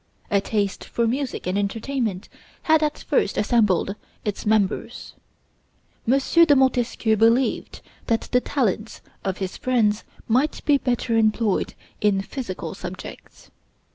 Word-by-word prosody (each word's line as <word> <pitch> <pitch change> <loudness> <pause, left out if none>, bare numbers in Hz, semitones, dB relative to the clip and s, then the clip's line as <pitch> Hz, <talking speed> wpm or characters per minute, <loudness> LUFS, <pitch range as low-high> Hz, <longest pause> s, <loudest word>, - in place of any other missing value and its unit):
A 200 -1 +3
taste 200 -1 -1
for 235 - -1
music 260 +3 -2
and 185 +3 0
entertainment 215 -1 -2 0.4
had 315 -1 +4
at 300 -1 0
first 265 - +1
assembled 210 -4 +2 0.3
its 210 0 -3
members. 210 -2 0 1.0
M. 270 - +5
de 325 +2 +5
Montesquieu 245 -4 +2
believed 230 +4 +2 0.3
that 230 -2 +2
the 250 - +3
talents 225 -6 -1 0.2
of 190 -1 -2
his 190 -1 -4
friends 225 -5 +1 0.2
might 260 +7 +1
be 290 -2 +4
better 245 -2 0
employed 220 -2 +1 0.3
in 205 -2 +3
physical 235 -6 -5
subjects. 185 -1 -10
225 Hz, 125 wpm, -23 LUFS, 205-260 Hz, 1.0 s, M